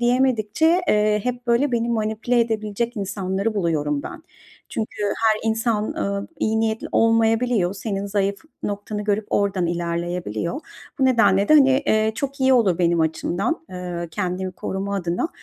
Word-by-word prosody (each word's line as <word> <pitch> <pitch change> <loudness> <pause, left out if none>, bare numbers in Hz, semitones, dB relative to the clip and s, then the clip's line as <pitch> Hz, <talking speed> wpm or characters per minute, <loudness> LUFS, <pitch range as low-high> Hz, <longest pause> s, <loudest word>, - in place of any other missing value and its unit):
diyemedikçe, 255 - +2
eee, 210 0 +3
hep 245 0 -3
böyle, 245 +3 +2
beni 235 0 0
manipüle 220 +2 0
edebilecek 225 +1 -2
insanları 195 +1 -2
buluyorum 150 -6 0
ben. 320 - -8 0.5
Çünkü 215 -1 -4
her 220 +2 +1
insan, 220 -1 0
ııı, 200 -1 -3
iyi 220 0 +1
niyetli 220 0 -1
olmayabiliyor. 225 -3 +2
Senin 200 -1 -3
zayıf 200 0 0 0.3
noktanı 205 +1 -4
görüp 210 0 0
ordan 195 -3 +1
ilerleyebiliyor. 170 - -3 0.4
Bu 265 - +3
nedenle 225 -6 +4
de, 310 - +7
hani, 270 -3 +7 0.2
eee, 220 0 +2
çok 275 +2 -4
iyi 265 0 +4
olur 200 -8 +3
benim 170 -1 +2
açımdan, 175 - -1
eee, 175 -2 -5
kendimi 185 0 -3
koruma 195 +2 -4
adına. 175 - -1
210 Hz, 145 wpm, -22 LUFS, 190-235 Hz, 0.5 s, de